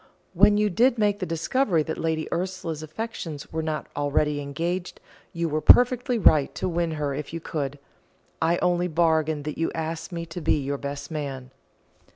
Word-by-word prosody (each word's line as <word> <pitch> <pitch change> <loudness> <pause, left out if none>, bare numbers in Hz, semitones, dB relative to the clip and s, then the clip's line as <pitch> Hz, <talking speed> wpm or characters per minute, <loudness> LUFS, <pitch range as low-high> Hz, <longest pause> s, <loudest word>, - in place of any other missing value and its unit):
When 205 +3 +5
you 210 -1 +2
did 240 +6 +3
make 205 -1 +2
the 185 - -3
discovery 165 - +1
that 160 - -4
Lady 160 -1 -1
Ursula's 175 -3 -3
affections 160 -3 -6
were 160 - -1
not 155 -1 -3
already 145 0 +1
engaged, 170 +6 -3 0.3
you 170 0 -2
were 155 0 -1
perfectly 245 - +5
right 155 -9 +4
to - - -2
win 170 -2 -1
her 145 -2 -2
if 150 +2 -6
you 165 - -3
could. 145 -3 -4 0.6
I 165 +2 +3
only 180 0 +2
bargain 160 -2 +1
that 150 +1 -5
you 165 - 0
ask 160 +1 -4
me 170 -1 -4
to 170 +2 -7
be 155 - +2
your 140 0 -3
best 140 +3 -6
man." 135 -4 -5
160 Hz, 180 wpm, -25 LUFS, 150-180 Hz, 0.6 s, When